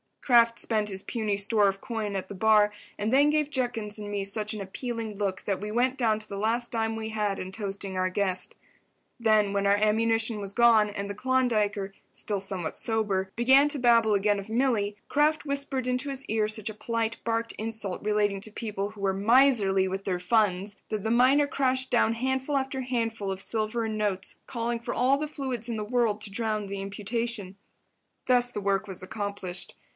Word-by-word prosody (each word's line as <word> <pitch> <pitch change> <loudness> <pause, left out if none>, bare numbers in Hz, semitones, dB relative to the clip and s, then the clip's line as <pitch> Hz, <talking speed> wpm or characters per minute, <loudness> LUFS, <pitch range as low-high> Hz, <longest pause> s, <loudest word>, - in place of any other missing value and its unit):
Kraft 235 -2 +4
spent 215 -2 +1
his 190 -1 -5
puny 215 -3 -1
store 205 0 +3
of 195 0 -2
coin 215 -4 -3
at 190 - -4
the - - -6
bar 210 +1 +4 0.3
and 210 +2 -1
then 285 +3 +5
gave 300 -1 +1
Judkins 230 -6 -3
and 205 -1 -6
me 205 -1 -2
such 210 +2 -2
an 215 - -5
appealing 225 +2 -5
look 195 -2 -2
that 195 -2 -1
we 210 +1 -5
went 250 +4 +1
down 220 -4 +2
to 215 - -12
the 200 - -6
last 230 +3 +1
dime 225 -1 -1
we 220 0 -4
had 210 -2 -1
in 185 - -6
toasting 195 -2 -4
our 185 0 +1
guest. 185 -1 +1 0.6
Then, 215 -3 +3
when 200 0 +1
our 200 - +5
ammunition 225 +1 +1
was 200 -1 -6
gone 230 -3 +5
and 200 -1 -5
the - - -3
Klondiker, 215 -5 0 0.2
still 205 -2 -2
somewhat 190 -4 -3
sober, 205 -4 0
began 265 +5 +5
to 290 - -1
babble 230 -4 +4
again 205 0 +2
of 200 +2 -9
Milly, 225 -4 +1
Kraft 300 +1 +2
whispered 280 -2 -1
into 255 +3 -1
his 275 0 -5
ear 215 0 0
such 215 0 -2
a - - -6
polite, 230 0 -2
barbed 230 0 -1
insult 220 -4 -3
relating 210 -1 +1
to 215 - -2
people 210 -2 -4
who 210 -2 -12
were 195 -1 +1
miserly 205 -3 +4
with 190 +1 -4
their 180 -2 -1
funds, 200 0 +1
that 215 -2 -3
the 220 - 0
miner 260 +5 +5
crashed 260 -2 0
down 230 -2 +3
handful 265 +4 -1
after 265 0 -2
handful 230 -5 -2
of 190 0 -5
silver 220 +2 -1
and 220 -1 -3
notes, 195 -3 -2
calling 235 -1 -2
for 235 - -4
all 260 +3 +3
the 305 +1 -3
fluids 260 -6 -3
in 235 - -2
the 210 - -2
world 220 -2 0
to 210 - -6
drown 215 0 -2
the 195 0 -5
imputation. 205 0 -4 0.7
Thus 245 -1 +4
the 210 - -4
work 200 +1 0
was 185 -2 -7
accomplished. 200 -2 -4
215 Hz, 200 wpm, -27 LUFS, 200-240 Hz, 0.7 s, then